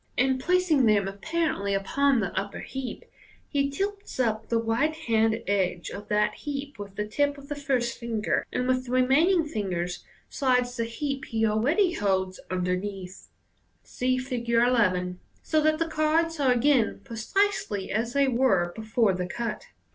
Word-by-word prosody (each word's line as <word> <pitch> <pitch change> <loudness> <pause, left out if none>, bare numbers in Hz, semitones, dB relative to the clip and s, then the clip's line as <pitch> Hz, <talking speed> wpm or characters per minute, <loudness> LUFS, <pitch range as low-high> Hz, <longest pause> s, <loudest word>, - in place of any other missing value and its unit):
In 260 +1 +2
placing 345 -5 +3
them 205 -2 +3
apparently 200 -1 -1
upon 265 +6 +2
the 190 -4 -3
upper 200 +1 -3
heap, 265 -2 -6 0.4
he 280 -1 0
tilts 400 +3 -4
up 220 -3 0
the 230 - +2
right 230 +8 +1
hand 225 -6 +1
edge 185 -4 0
of 205 +1 -8
that 210 0 +2
heap 280 -3 -6
with 200 -1 -8
the 210 - -2
tip 285 +6 0
of 280 0 -13
the 290 - -3
first 265 -4 -1
finger, 230 -3 -1
and 250 - -1
with 255 0 +1
the - - -5
remaining 305 +8 +4
fingers 180 - -3 0.2
slides 250 -2 +1
the 230 -2 -1
heap 275 +4 -4
he 225 -1 0
already 280 - +2
holds 190 - 0
under= 180 0 0
neathit 190 -1 -7 0.6
(see 255 0 -1
Fig. 250 -2 -4
11), 210 -7 +2 0.2
so 310 -1 +2
that 310 0 +3
the 330 +1 0
cards 320 +1 +1
are 270 -3 +3
again 245 -3 +2
precisely 230 - -1
as 230 +3 -1
they 280 -1 +3
were 210 -9 +2
before 220 -1 +1
the 180 -1 -3
cut. 230 +3 -4
240 Hz, 160 wpm, -27 LUFS, 205-280 Hz, 0.6 s, remaining